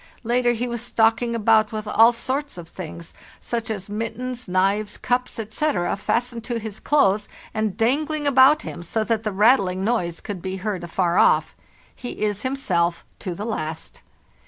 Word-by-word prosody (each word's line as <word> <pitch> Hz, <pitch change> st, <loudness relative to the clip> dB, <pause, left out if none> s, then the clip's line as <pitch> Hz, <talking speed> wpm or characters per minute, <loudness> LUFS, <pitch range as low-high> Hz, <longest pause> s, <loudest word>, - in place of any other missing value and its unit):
Later 240 Hz, +1 st, +2 dB
he 240 Hz, +2 st, -2 dB
was 235 Hz, -1 st, -4 dB
stalking 235 Hz, 0 st, +2 dB
about 220 Hz, -1 st, +3 dB
with 215 Hz, -1 st, -5 dB
all 225 Hz, +2 st, +6 dB
sorts 265 Hz, +2 st, -3 dB
of 170 Hz, -1 st, -8 dB
things, 170 Hz, -1 st, -8 dB, 0.3 s
such 230 Hz, -1 st, -3 dB
as 200 Hz, -3 st, -4 dB
mittens, 230 Hz, +4 st, -4 dB
knives, 195 Hz, +3 st, +1 dB
cups, 250 Hz, +1 st, -1 dB
etc., 220 Hz, -4 st, -1 dB
fastened 235 Hz, +3 st, -1 dB
to 240 Hz, -2 st, -2 dB
his 220 Hz, -2 st, -6 dB
clothes 210 Hz, -8 st, +2 dB, 0.2 s
and 215 Hz, -2 st, -1 dB
dangling 295 Hz, +6 st, +1 dB
about 280 Hz, +2 st, +6 dB
him, -, -, -7 dB
so 215 Hz, +6 st, -1 dB
that 220 Hz, 0 st, 0 dB
the 215 Hz, -1 st, -2 dB
rattling 195 Hz, -3 st, +3 dB
noise 185 Hz, -7 st, 0 dB
could 200 Hz, -5 st, -6 dB
be 190 Hz, +1 st, -4 dB
heard 195 Hz, -2 st, -3 dB
afar 175 Hz, +1 st, +1 dB
off. -, -, +3 dB, 0.4 s
He 245 Hz, -, -7 dB
is 205 Hz, -1 st, 0 dB
himself 180 Hz, -11 st, 0 dB
to 180 Hz, -3 st, -4 dB
the 205 Hz, -, -5 dB
last. 160 Hz, -8 st, -5 dB
220 Hz, 165 wpm, -23 LUFS, 190-240 Hz, 0.4 s, all